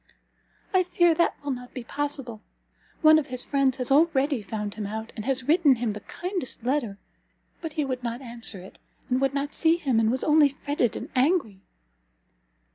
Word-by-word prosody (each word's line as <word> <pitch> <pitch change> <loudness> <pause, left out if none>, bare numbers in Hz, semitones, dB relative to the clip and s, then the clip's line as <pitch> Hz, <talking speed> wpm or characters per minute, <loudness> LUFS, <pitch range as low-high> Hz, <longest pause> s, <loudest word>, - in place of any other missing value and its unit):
"I 375 - +5
fear 345 -1 +3
that 340 +2 +1
will 285 - -2
not 250 -1 -7
be 255 - -5
possible. 275 -4 -3 0.6
One 310 0 +8
of 295 - -5
his 250 -1 0
friends 275 -2 +1
has 250 0 -2
already 280 -3 +3
found 210 0 -5
him 210 -2 -5
out, 220 +2 -6
and 215 - -6
has 265 -1 0
written 310 -3 +5
him 230 -3 -2
the 210 - -7
kindest 355 - -5
letter! 245 -6 -1 0.6
but 325 -3 -5
he 300 -2 -1
would 255 -2 -3
not 235 0 -4
answer 235 -5 -4
it, 185 - -14 0.3
and 255 +1 +2
would 270 0 +1
not 280 +1 -2
see 325 0 +3
him, 265 -9 +1
and 220 -1 +2
was 255 +2 -1
only 300 -1 +5
fretted 280 -4 -1
and 245 - -7
angry." 255 - +1
265 Hz, 190 wpm, -26 LUFS, 235-300 Hz, 0.6 s, One